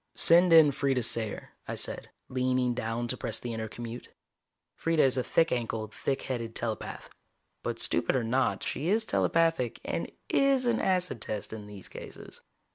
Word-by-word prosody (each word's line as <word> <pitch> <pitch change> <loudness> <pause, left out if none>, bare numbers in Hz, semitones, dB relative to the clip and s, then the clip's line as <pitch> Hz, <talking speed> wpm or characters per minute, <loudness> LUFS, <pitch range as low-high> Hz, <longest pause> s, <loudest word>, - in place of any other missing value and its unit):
"Send 170 +1 +6
in 160 -3 +8
Freeda 135 -2 0
Sayer," 110 -1 -1 0.2
I - - -3
said, - - -3 0.2
leaning 130 -1 +1
down 115 +1 -2
to 130 - 0
press - - -3
the 120 - -5
intercommute. 115 +2 -6 0.7
Freeda 165 0 -1
is 135 -1 +3
a 130 - 0
thick 165 +5 +2
ankled, 110 -3 -2
thick 135 -1 -2
headed 115 -3 -4
telepath. 115 -2 -4 0.5
But - - -3
stupid 85 - +1
or 130 - +1
not, 130 +4 +1
she 155 +5 -2
is 220 +2 +2
telepathic, 165 - +1
and - - -3 0.2
is 275 -2 +3
an 235 -1 +2
acid 180 - 0
test 105 0 -4
in 105 -2 -7
these 100 -2 -10
cases. - - -10
125 Hz, 165 wpm, -29 LUFS, 115-165 Hz, 0.7 s, in